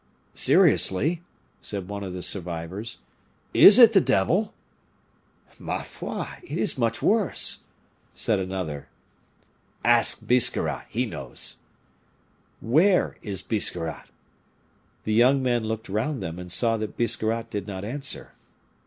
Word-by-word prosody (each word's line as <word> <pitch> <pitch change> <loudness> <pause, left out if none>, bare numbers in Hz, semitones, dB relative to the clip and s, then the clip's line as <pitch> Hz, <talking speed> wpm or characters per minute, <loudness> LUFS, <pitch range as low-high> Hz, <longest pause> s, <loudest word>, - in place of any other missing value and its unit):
"Seriously," 155 - +3 0.4
said 100 -3 -5
one 100 0 -6
of 95 - -6
the 90 0 -6
survivors, 90 +4 -5 0.6
"is 200 - +9
it 235 -3 +8
the 195 - +5
devil?" 180 - +1 1.1
"Ma - - -4
foi! - - -6 0.2
it 355 - -7
is 210 - 0
much 115 -3 -2
worse," 210 -3 +3 0.5
said 110 -3 0
another. 90 -6 -5 1.0
"Ask 120 0 +3
Biscarrat, 125 -1 +1
he - - -1
knows." - - -5 1.0
"Where 170 - +2
is 95 -3 -3
Biscarrat?" 85 -7 -1 1.0
The 110 - -2
young 130 +4 +4
men 120 -3 0
looked 110 +1 -4
round 115 +8 -3
them, 80 +2 -6
and 90 -1 -7
saw 115 +5 +2
that 110 -1 -6
Biscarrat 115 0 -1
did 105 -2 -5
not 95 -1 -6
answer. 135 +5 -4
110 Hz, 120 wpm, -24 LUFS, 95-130 Hz, 1.1 s, is